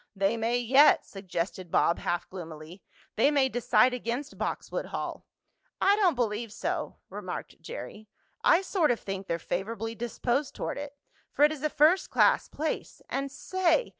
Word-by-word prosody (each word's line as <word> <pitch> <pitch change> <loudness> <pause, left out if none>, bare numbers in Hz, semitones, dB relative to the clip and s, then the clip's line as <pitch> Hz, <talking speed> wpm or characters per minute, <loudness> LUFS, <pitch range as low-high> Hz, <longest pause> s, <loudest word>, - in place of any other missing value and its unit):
"They 195 +3 +1
may 230 +2 0
yet," 265 +5 +5
suggested 185 -1 -4
Bob 170 - +2
half 175 0 -2
gloomily. 165 0 -9 0.4
"They 250 +6 +5
may 280 -3 +3
decide 245 0 +3
against 250 +4 -3
Boxwood - - -3
Hall." - - -5 0.5
"I 400 - +5
don't 380 -7 +3
believe 230 -2 -1
so," - - -3 0.2
remarked - - -6
Jerry. 215 - -8 0.4
"I 350 +3 +5
sort 370 -5 +1
of 245 - +1
think 195 0 -5
they're 170 - 0
favorably 220 +6 -3
disposed 240 +4 -2
toward - - -3
it, 285 0 -7 0.3
for 290 - +5
it 300 - +3
is 305 -3 -6
a 305 - +1
first 315 +6 +4
class - - +4
place. 315 +1 -4
And 275 0 -2
say! 375 - +1
240 Hz, 160 wpm, -28 LUFS, 200-295 Hz, 0.5 s, yet